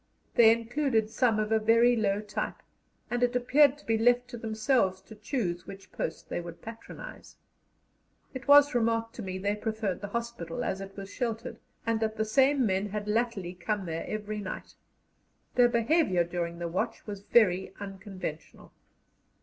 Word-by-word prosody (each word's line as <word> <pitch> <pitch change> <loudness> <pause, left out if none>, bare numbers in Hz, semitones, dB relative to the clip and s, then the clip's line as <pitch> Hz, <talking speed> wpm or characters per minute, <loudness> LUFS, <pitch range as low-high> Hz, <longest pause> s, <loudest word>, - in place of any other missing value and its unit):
They 225 -2 +7
included 230 -1 0
some 230 -1 +2
of 215 0 -1
a 220 - +4
very 230 +3 +5
low 205 -2 +1
type, 210 0 -4 0.5
and 240 0 0
it 245 0 +2
appeared 275 +3 +4
to 295 - -19
be 225 -1 +1
left 245 +2 +3
to 240 - -7
themselves 220 -3 +1
to 220 - -13
choose 205 -5 -3
which 195 0 -11
post 160 - -4
they - - -3
would 170 -1 -10
patronize. 225 0 -10 1.0
It 260 0 -7
was 285 0 +7
remarked 230 -1 +1
to - - -4
me 185 -2 -4
they 200 +2 -1
preferred 215 -3 -3
the 205 - -4
hospital, 235 +3 -4
as 195 -4 -2
it 195 0 -9
was 195 0 -7
sheltered, 230 -3 -3 0.3
and 230 -1 +1
that 220 0 -1
the 220 - +1
same 265 +4 +3
men 195 0 0
had 210 +1 -4
latterly 210 -5 -1
come 195 +2 -3
there 165 -1 -4
every 215 0 -4
night. 190 -2 -6 0.8
Their 245 -1 +5
behaviour 235 - +2
during 170 0 -3
their 170 0 -3
watch 215 +7 -3
was 205 -2 -6
very 190 -4 +3
unconventional. 195 -5 -7
220 Hz, 170 wpm, -29 LUFS, 195-240 Hz, 1.0 s, They